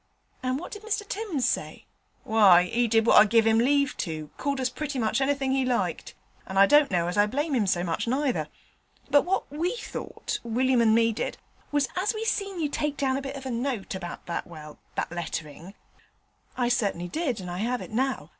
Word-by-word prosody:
'And 255 0 -1
what 335 - -8
did 420 - -8
Mr 425 -1 -3
Timms 395 - -2
say?' - - -3 0.4
'Why 200 -5 +6
'e 235 +6 0
did 225 0 +3
what - - +6
I - - +6
give 225 +1 +3
'im 225 0 +4
leave 280 +3 +2
to 155 -4 -4
called 280 0 -2
us 260 - +1
pretty 290 0 -4
much 230 +2 0
anythink 270 -1 +1
he 265 -1 +2
liked, 250 -2 -2 0.3
and 190 - -4
I 195 - +8
don't 295 +6 +5
know 175 -2 +1
as 180 +4 -1
I 205 - +5
blame 290 +7 -2
him 225 -6 +1
so 175 -2 +1
much 170 +5 -2
neither. 265 +2 0 0.6
But 285 - +5
what 380 -3 -1
we 340 +9 -1
thought, - - -5
William 245 +2 +2
and 220 -1 +4
me 230 0 +3
did, - - -3 0.3
was 290 -2 +2
as 385 +5 0
we 440 +1 -3
seen 395 -4 -1
you 310 - +1
take 295 0 -2
down 265 -1 +1
a 275 - -2
bit 275 0 -6
of 270 -1 -8
a 260 - -3
note 235 -3 -3
about 175 -2 -7
that 170 - -4
well, 155 -3 -11 0.2
that - - -2
letterin' 170 +1 -6 0.4
' - - -36
'I 245 -1 +1
certainly 200 -7 0
did 275 - -1
that, 205 - -8
and 180 -1 -6
I 175 - -4
have 245 +4 -1
it - - -9
now. 245 - -1
245 Hz, 220 wpm, -26 LUFS, 200-285 Hz, 0.6 s, I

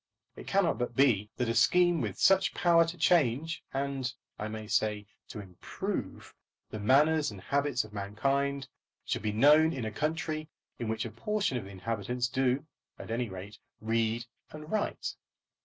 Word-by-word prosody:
It - - -11
cannot 195 -7 +2
but 120 -1 -2
be 110 -6 +3
that 125 - 0
a 115 - +1
scheme 175 +5 +4
with 105 -5 -3
such 195 0 +4
power 170 -1 +5
to 165 +2 -6
change, 160 -2 +2
and, 135 -2 -2 0.3
I 105 - -3
may 110 0 -6
say, 105 -1 0 0.2
to 110 - -8
improve, 95 -3 -5 0.4
the 110 - -5
manners 145 +7 +4
and 100 -3 -9
habits 140 +4 0
of 110 -1 -13
mankind, 135 +7 -1 0.4
should - - -2
be 105 - -1
known 150 +8 +5
in 125 -4 -4
a 110 - -3
country 155 +4 -2 0.3
in 115 - -3
which 110 +1 -2
a 115 - -5
portion 205 - -1
of 100 - -9
the - - -10
inhabitants 115 +5 -2
do, 130 +2 +1 0.3
at - - -8
any 120 0 -1
rate, 100 +3 -9 0.2
read 115 +1 0 0.2
and 155 +1 -10
write. 215 -1 -1
125 Hz, 170 wpm, -30 LUFS, 110-155 Hz, 0.4 s, power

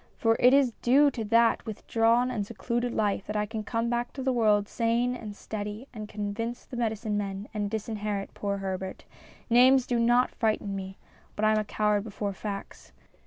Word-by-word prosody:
For 225 -1 +3
it 250 - +6
is 270 -2 +4
due 280 +4 +5
to 235 -3 -4
that 230 +2 +3
with 215 - -7
drawn 235 +2 +3
and 220 -5 -1
secluded 235 +3 -2
life 205 -3 -1
that 210 - -4
I 210 0 +1
can 215 0 -5
come 230 +2 -1
back 240 0 -1
to. 265 - -5
the 260 0 +1
world 210 -4 +3
sane 235 +2 0
and 215 -4 -7
steady 210 +4 -6
and 215 -2 -7
convince 220 +3 -4
the - - -9
medicine 220 -3 -1
men 200 +1 -4
and 205 -2 -2
disinherit 210 -2 -3
poor 200 -1 -2
Herbert. 190 -1 -5 0.4
Names 255 +2 +6
do 240 -1 0
not 240 +2 +3
frighten 215 -3 -1
me, 190 0 -6 0.4
but 215 - 0
I 215 - +5
am 215 - +3
a - - 0
coward 210 -1 0
before 205 -2 -4
facts. 200 0 -7
220 Hz, 195 wpm, -28 LUFS, 205-240 Hz, 0.4 s, it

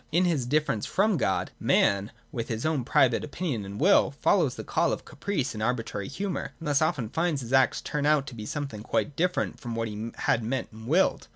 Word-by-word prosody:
In 175 +4 +3
his 150 -9 0
difference 145 -6 0
from 205 +2 +2
God, - - 0
man, 100 +1 +2 0.2
with 115 -2 -4
his 115 +1 -3
own 155 -5 +1
private 130 -2 +3
opinion 150 - -3
and 100 +1 -7
will, - - +5
follows - - +2
the - - -6
call - - +1
of - - -4
caprice 170 -10 -2
and 110 - -6
arbitrary 115 -4 -2
humour, 190 +6 -4
and 165 - -7
thus 145 0 +2
often 150 -8 0
finds 160 0 0
his 120 +1 -6
acts 135 0 +4
turn 145 -1 -1
out 150 -3 +2
something 140 -5 -4
quite 135 +5 -1
different 180 +3 0
from 120 -2 -5
what 115 0 -1
he 110 +2 -5
had 115 - +1
meant 130 +4 -2
and 110 +1 -11
willed. 175 +8 +2
135 Hz, 205 wpm, -27 LUFS, 115-155 Hz, 0.2 s, will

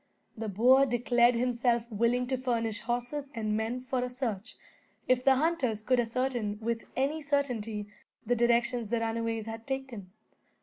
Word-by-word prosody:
The 220 -1 -4
boer 255 +7 +5
declared 240 0 +3
himself 240 -1 +1
willing 235 +4 +1
to 260 +1 -1
furnish 230 -4 -1
horses 245 +5 -3
and 215 -2 -1
men 225 +3 -2
for 255 0 -2
a 250 - -2
search, 245 -4 -4 0.5
if 255 0 +3
the 270 0 +5
hunters 265 -8 0
could 255 +2 +2
ascertain, 240 -3 -1
with 230 +1 -2
any 280 +4 0
certainty, 245 -8 -1 0.4
the 245 +2 +2
direction 240 +1 +2
the 230 +1 -1
runaways 225 -1 -2
had 225 0 -7
taken. 265 -8 -5
240 Hz, 150 wpm, -30 LUFS, 225-255 Hz, 0.5 s, boer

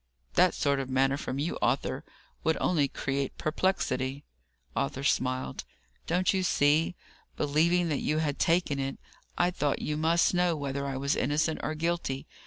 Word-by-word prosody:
That - - +4
sort 140 -1 +1
of 135 -1 -4
manner 135 +1 +2
from 135 -2 -4
you, 150 +5 -2
Arthur, - - 0 0.4
would 160 0 +2
only 150 -6 +2
create 135 0 -3
perplexity." 145 -5 -1 0.5
Arthur 70 - -1
smiled. 130 - 0 0.4
"Don't 180 +5 +2
you 190 - +1
see? 160 0 +2 0.4
believing 170 +4 +2
that 145 - 0
you 155 - 0
had 150 -2 -1
taken 165 -4 +2
it, 135 0 -2 0.4
I 175 +1 +3
thought 150 -5 0
you 150 0 -1
must 165 +3 +3
know 175 -1 +2
whether 140 -1 -3
I 135 -1 -3
was 140 +2 0
innocent 150 +4 0
or 155 - -2
guilty. 160 -4 -2
145 Hz, 160 wpm, -29 LUFS, 135-165 Hz, 0.5 s, That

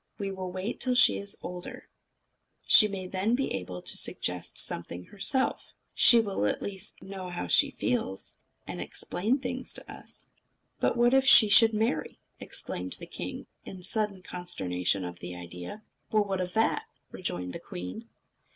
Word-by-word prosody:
"We 200 -1 -4
will 185 -1 -6
wait 185 +5 -4
till 255 -1 +1
she 250 - +5
is 200 0 -1
older. 180 0 -8 0.8
She 215 - +7
may 195 -2 -6
then 190 +5 0
be 270 - -2
able 90 -1 -6
to - - +1
suggest 90 0 0
something 85 +1 0
herself. 260 +6 -1 0.2
She 235 - +7
will 205 -4 -2
know 105 - +1
at 105 - -1
least 195 0 -3
how 185 -2 -6
she 285 - +4
feels, 245 - -3 0.3
and - - -6
explain 220 +9 0
things 255 -1 0
to - - -4
us." - - -7 0.5
"But - - +1
what 240 +1 +4
if 270 0 +4
she 215 -5 +9
should 225 +2 +7
marry?" 225 +4 -1 0.2
exclaimed - - -4
the - - -3
king, - - -7 0.2
in 185 -1 -9
sudden 205 -1 0
consternation 95 - -2
at 90 0 -7
the 90 0 -7
idea. 90 - -9 0.3
"Well, 215 -1 +3
what 195 -2 -3
of 180 0 -4
that?" 225 - +1 0.3
rejoined 90 - -3
the - - -6
queen. 90 +1 -8
190 Hz, 165 wpm, -28 LUFS, -, 0.8 s, she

